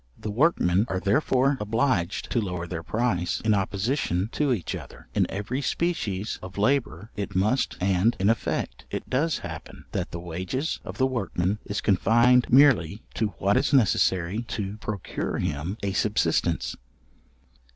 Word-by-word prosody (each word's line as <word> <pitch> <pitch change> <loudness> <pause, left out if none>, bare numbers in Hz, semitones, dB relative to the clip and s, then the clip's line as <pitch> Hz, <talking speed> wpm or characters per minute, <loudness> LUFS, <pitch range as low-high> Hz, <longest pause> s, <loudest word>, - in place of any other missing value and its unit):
The 105 - -5
workmen 105 - +3
are 95 - -1
therefore 130 +6 +2
obliged 105 -4 0
to 120 - +2
lower 90 -4 -3
their 85 -1 -5
price 100 -2 -1
in 110 -1 +2
opposition 100 0 0
to 145 -3 +1
each 105 -9 -1
other. - - -9
In - - +1
every 105 +8 -3
species 115 - -1
of 95 +1 -9
labour 105 - 0
it 100 -1 -4
must, 105 +8 +1
and, 95 +5 +2
in 95 - +2
effect, 115 0 -1
it - - -5
does 150 +5 +1
happen, - - -9
that - - -2
the 85 - -6
wages 90 - -3
of - - -8
the 130 - +3
workman 105 -6 -1
is 100 - -3
confined 120 +5 +4
merely 120 - +5
to 110 - 0
what 100 +1 +2
is 145 - +1
necessary 95 -5 +2
to 105 -3 -4
procure 105 -3 -4
him 75 +8 -2
a 100 -1 -1
subsistence. 105 +1 +1
105 Hz, 150 wpm, -26 LUFS, 95-125 Hz, -, merely